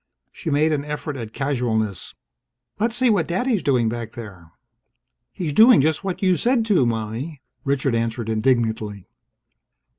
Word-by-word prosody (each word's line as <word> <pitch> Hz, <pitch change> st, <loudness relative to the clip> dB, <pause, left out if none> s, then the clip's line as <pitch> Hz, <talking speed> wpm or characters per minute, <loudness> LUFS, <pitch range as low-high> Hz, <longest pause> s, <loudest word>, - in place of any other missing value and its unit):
She 165 Hz, -, -6 dB
made 150 Hz, +2 st, +2 dB
an 145 Hz, -2 st, 0 dB
effort 150 Hz, 0 st, -5 dB
at 115 Hz, -4 st, -6 dB
casualness: 115 Hz, -, -2 dB, 0.6 s
"Let's 230 Hz, +2 st, 0 dB
see 250 Hz, -1 st, +3 dB
what 180 Hz, -7 st, +1 dB
Daddy's 215 Hz, +4 st, 0 dB
doing 125 Hz, -5 st, +2 dB
back 115 Hz, 0 st, -4 dB
there." 95 Hz, -8 st, -10 dB, 0.8 s
"He's 160 Hz, -5 st, -4 dB
doing 230 Hz, -, +7 dB
just 155 Hz, +5 st, +1 dB
what 190 Hz, 0 st, -4 dB
you 185 Hz, -2 st, +3 dB
said 240 Hz, -2 st, +2 dB
to, 185 Hz, -, +3 dB
Mommie!" 115 Hz, +6 st, -4 dB, 0.2 s
Richard 135 Hz, -2 st, 0 dB
answered 115 Hz, 0 st, -1 dB
indignantly. 110 Hz, -3 st, 0 dB
135 Hz, 145 wpm, -22 LUFS, 115-175 Hz, 0.8 s, doing